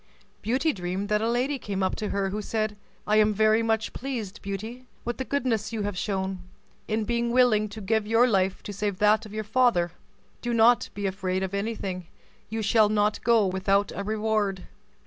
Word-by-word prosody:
Beauty 265 Hz, +8 st, +1 dB
dreamed 185 Hz, +2 st, -3 dB
that 210 Hz, 0 st, +2 dB
a 225 Hz, -, +1 dB
lady 255 Hz, +4 st, 0 dB
came 195 Hz, -4 st, -3 dB
up 190 Hz, -, 0 dB
to 215 Hz, -, -3 dB
her, 195 Hz, -1 st, -1 dB
who 210 Hz, +2 st, -3 dB
said, 215 Hz, 0 st, -2 dB, 0.3 s
"I 215 Hz, +1 st, +3 dB
am 215 Hz, -1 st, +4 dB
very 215 Hz, +1 st, +4 dB
much 225 Hz, 0 st, 0 dB
pleased, 235 Hz, -7 st, -5 dB
Beauty, 220 Hz, +6 st, -6 dB, 0.2 s
with 240 Hz, 0 st, -3 dB
the -, -, 0 dB
goodness 240 Hz, -6 st, -1 dB
you 220 Hz, -2 st, -2 dB
have 205 Hz, -1 st, -3 dB
shown, 190 Hz, 0 st, -2 dB, 0.5 s
in 220 Hz, 0 st, 0 dB
being 235 Hz, +2 st, 0 dB
willing 235 Hz, -4 st, +3 dB
to 215 Hz, +1 st, -8 dB
give 215 Hz, +1 st, 0 dB
your 230 Hz, +2 st, +5 dB
life 190 Hz, -4 st, +1 dB
to 205 Hz, -, -6 dB
save 205 Hz, -1 st, -2 dB
that 215 Hz, +2 st, +3 dB
of 210 Hz, -, -13 dB
your 215 Hz, -, -2 dB
father. 215 Hz, -6 st, +2 dB, 0.5 s
Do 240 Hz, -1 st, -1 dB
not 230 Hz, +2 st, +5 dB
be 205 Hz, 0 st, -3 dB
afraid 190 Hz, -1 st, -1 dB
of 190 Hz, 0 st, -4 dB
anything; 200 Hz, -4 st, -3 dB, 0.4 s
you 220 Hz, 0 st, -3 dB
shall 215 Hz, 0 st, +4 dB
not 210 Hz, 0 st, +1 dB
go 230 Hz, -3 st, +4 dB
without 195 Hz, +2 st, +1 dB
a 200 Hz, -, -3 dB
reward." 210 Hz, -2 st, -1 dB
215 Hz, 195 wpm, -26 LUFS, 200-225 Hz, 0.5 s, your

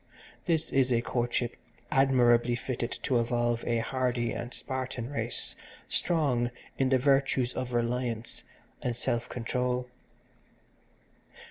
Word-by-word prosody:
This 165 Hz, -2 st, +1 dB
is 130 Hz, -1 st, +3 dB
a 120 Hz, -1 st, +3 dB
courtship 120 Hz, -1 st, 0 dB, 0.4 s
admirably 125 Hz, -4 st, +4 dB
fitted 120 Hz, -1 st, -3 dB
to 130 Hz, -4 st, +2 dB
evolve 120 Hz, 0 st, +1 dB
a 120 Hz, -1 st, +2 dB
hardy 120 Hz, 0 st, 0 dB
and 120 Hz, -, -4 dB
Spartan 130 Hz, -2 st, -4 dB
race 145 Hz, -, -4 dB, 0.3 s
strong 135 Hz, -8 st, +1 dB, 0.3 s
in 135 Hz, -1 st, +3 dB
the 130 Hz, -, +5 dB
virtues 135 Hz, -2 st, +2 dB
of 130 Hz, -1 st, -3 dB
reliance 120 Hz, -1 st, -1 dB, 0.4 s
and 120 Hz, -1 st, -1 dB
self 120 Hz, 0 st, -1 dB
control. 125 Hz, +1 st, -1 dB
125 Hz, 115 wpm, -30 LUFS, 120-130 Hz, 0.4 s, the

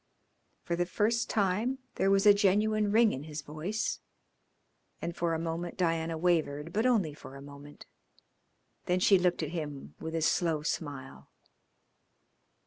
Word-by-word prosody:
For 170 Hz, -, -1 dB
the 175 Hz, 0 st, -1 dB
first 225 Hz, +5 st, 0 dB
time 215 Hz, +6 st, 0 dB, 0.2 s
there 195 Hz, -, +1 dB
was 195 Hz, 0 st, +3 dB
a 205 Hz, -, +9 dB
genuine 210 Hz, +1 st, +2 dB
ring 225 Hz, 0 st, +4 dB
in 135 Hz, +3 st, -6 dB
his 150 Hz, -1 st, -6 dB
voice, 155 Hz, +9 st, -3 dB, 1.0 s
and 170 Hz, 0 st, -4 dB
for 170 Hz, -1 st, 0 dB
a -, -, -2 dB
moment 165 Hz, +1 st, -4 dB
Diana 165 Hz, -2 st, 0 dB
wavered, 160 Hz, -2 st, 0 dB
but 220 Hz, +4 st, +2 dB
only 200 Hz, -12 st, +2 dB
for 140 Hz, -2 st, -12 dB
a -, -, -9 dB
moment. 145 Hz, +1 st, -12 dB, 1.0 s
Then 180 Hz, +1 st, +2 dB
she 190 Hz, +1 st, +5 dB
looked 180 Hz, -2 st, +1 dB
at 155 Hz, -, -3 dB
him 150 Hz, -5 st, -6 dB
with 160 Hz, 0 st, -5 dB
a 165 Hz, -, 0 dB
slow 160 Hz, -2 st, +1 dB
smile. 135 Hz, -, -5 dB
170 Hz, 150 wpm, -30 LUFS, 155-200 Hz, 1.0 s, a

